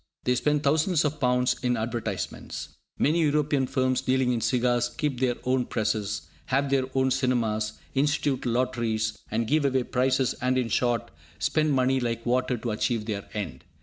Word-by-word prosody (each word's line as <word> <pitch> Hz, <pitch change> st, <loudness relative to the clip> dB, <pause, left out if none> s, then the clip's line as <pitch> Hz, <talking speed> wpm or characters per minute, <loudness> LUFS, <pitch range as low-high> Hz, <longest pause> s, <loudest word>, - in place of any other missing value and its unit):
They 125 Hz, -, +2 dB
spend 150 Hz, +3 st, +1 dB
thousands 160 Hz, +3 st, +2 dB
of 150 Hz, +1 st, -1 dB
pounds 125 Hz, -1 st, +2 dB
in 125 Hz, -2 st, +1 dB
advertisements. 110 Hz, -3 st, -4 dB, 0.3 s
Many 165 Hz, +4 st, +2 dB
European 145 Hz, -3 st, +2 dB
firms 130 Hz, 0 st, +1 dB
dealing 130 Hz, -1 st, +2 dB
in 115 Hz, -, -1 dB
cigars 120 Hz, +1 st, +2 dB
keep 135 Hz, 0 st, -2 dB
their 125 Hz, -2 st, +1 dB
own 125 Hz, -1 st, +1 dB
presses, 105 Hz, -2 st, -1 dB, 0.2 s
have 140 Hz, +1 st, +1 dB
their 135 Hz, -1 st, +3 dB
own 130 Hz, 0 st, +3 dB
cinemas, 110 Hz, -5 st, 0 dB, 0.2 s
institute 140 Hz, -2 st, +1 dB
lotteries, 115 Hz, -3 st, 0 dB
and 115 Hz, +2 st, 0 dB
give 150 Hz, +5 st, +2 dB
away 130 Hz, -2 st, +2 dB
prizes, 130 Hz, +1 st, +1 dB
and, 130 Hz, +1 st, +1 dB
in 125 Hz, -3 st, 0 dB
short, 120 Hz, -8 st, 0 dB, 0.3 s
spend 155 Hz, +9 st, +1 dB
money 130 Hz, 0 st, +2 dB
like 115 Hz, -2 st, -2 dB
water 125 Hz, +1 st, +1 dB
to 115 Hz, 0 st, -3 dB
achieve 110 Hz, +1 st, -1 dB
their 105 Hz, -2 st, -4 dB
end. 80 Hz, -11 st, -4 dB
125 Hz, 165 wpm, -27 LUFS, 115-135 Hz, 0.3 s, their